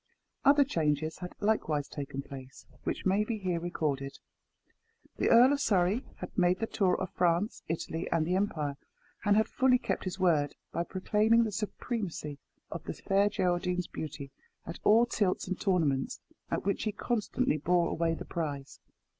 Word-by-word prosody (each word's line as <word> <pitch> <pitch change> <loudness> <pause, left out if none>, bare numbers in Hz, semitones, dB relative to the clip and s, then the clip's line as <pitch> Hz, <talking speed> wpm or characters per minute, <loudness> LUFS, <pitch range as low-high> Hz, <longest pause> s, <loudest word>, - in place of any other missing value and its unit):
Other 285 +1 +6
changes 155 - -1
had 180 0 -6
likewise 160 -9 +1
taken 140 -1 -5
place, 135 -1 -11 0.2
which - - -3
may 195 +2 +3
be 220 +1 -3
here 180 -4 -1
recorded. 145 -5 -2 1.0
The - - +2
Earl 245 +4 +7
of 285 - 0
Surrey 200 0 +2
had - - -8
made 180 -1 +3
the 225 - -1
tour 190 -5 +1
of 185 - -3
France, 175 +5 +1
Italy, 165 0 -3
and 165 -2 +2
the 175 - 0
Empire, 155 -8 -1 0.5
and 205 0 +4
had 220 - +3
fully 255 -1 +3
kept - - -3
his 185 0 -3
word, 155 -6 +2 0.2
by 170 - -1
proclaiming 215 +5 +3
the 220 - -2
supremacy 195 - -4 0.3
of - - -5
the - - -3
Fair 200 +1 +2
Geraldine's 180 -1 0
beauty 145 -4 -7 0.3
at - - -7
all 225 +3 +6
tilts 205 -6 0
and 185 0 -3
tournaments, 155 -9 +1 0.3
at - - -2
which 200 - 0
he 215 - +1
constantly 235 -3 0
bore 175 +2 +2
away 165 0 0
the - - -7
prize. 145 -5 -4
180 Hz, 165 wpm, -30 LUFS, 155-210 Hz, 1.0 s, Earl